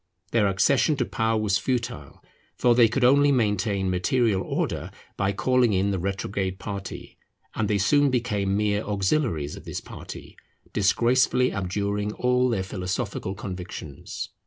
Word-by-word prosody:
Their 110 -3 +3
accession 125 +10 +3
to 130 -3 0
power 110 -1 0
was 105 -2 +1
futile; 120 - -3 0.3
for 120 - +3
they 120 -1 +6
could 125 +4 -1
only 140 +3 +5
maintain 105 -5 +1
material 100 +2 +1
order - - -2 0.3
by 100 0 0
calling 120 +2 +2
in 95 +1 +1
the 95 - -1
retrograde 95 0 -2
party; 100 -1 -7 0.3
and 110 - -1
they 105 - +1
soon 140 +9 +3
became 105 -6 0
mere 105 -1 +1
auxiliaries 100 - -1
of - - -12
this - - -4
party, - - -10 0.4
disgracefully 125 +5 +3
abjuring 100 +2 -2
all 125 +1 +2
their 105 -6 0
philosophical 95 0 -3
convictions. 90 -7 -7
105 Hz, 140 wpm, -25 LUFS, 95-120 Hz, 0.4 s, they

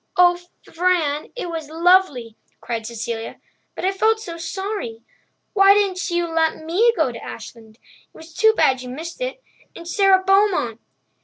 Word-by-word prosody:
"Oh, 355 -1 +5 0.2
Fran, 325 -4 0
it 360 -8 -5
was 320 -3 -5
lovely!" 325 - +2 0.2
cried 225 -2 -4
Cecilia. 230 -1 -5 0.4
"But - - -4
I 380 - +2
felt 440 +3 +2
so 350 -6 -7
sorry—why 385 - -1
didn't 390 -2 0
you 345 0 0
let 325 -1 0
me 405 +9 +3
go - - +1
to - - -10
Ashland? 225 -2 -10
It - - -24
was 320 0 -13
too 440 +5 +4
bad 260 -1 +3
you 250 - -8
missed 330 - -8
it—and - - -8
Sara 380 +1 +3
Beaumont." 390 - +2
340 Hz, 150 wpm, -21 LUFS, 265-390 Hz, 0.4 s, Oh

